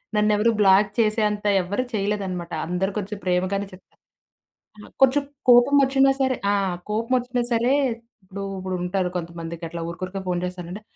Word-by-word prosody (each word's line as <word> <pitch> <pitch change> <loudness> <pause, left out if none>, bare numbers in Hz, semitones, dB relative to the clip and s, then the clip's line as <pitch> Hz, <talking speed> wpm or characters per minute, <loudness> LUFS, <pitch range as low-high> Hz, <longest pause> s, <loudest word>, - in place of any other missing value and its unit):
నన్నెవరు 210 +2 +3
black 195 +1 +5
చేసేంత 215 -1 +1 0.2
ఎవరు 205 +8 -2
చేయలేదన్నమాట! 195 -4 -2 0.2
అందరు 180 +3 -1
కొంచం 210 0 -4
ప్రేమగానే 185 +2 0
చెప్తా. 185 - -17 1.1
కొంచెం 270 +2 +5 0.3
కోపమొచ్చినా 270 +2 +5
సరే 260 -1 +2 0.2
ఆ! - - +2 0.4
కోపమొచ్చినా 245 +2 0
సరే, 235 +3 +2 0.5
ఇప్పుడు 195 +1 -7 0.2
ఇప్పుడుంటారు 185 0 -2
కొంతమందికట్లా 170 0 -6
ఊరుకురికే 185 +3 -5
ఫోన్ 175 -1 0
చేసారంటే, 180 +3 -7
200 Hz, 115 wpm, -23 LUFS, 180-230 Hz, 1.1 s, black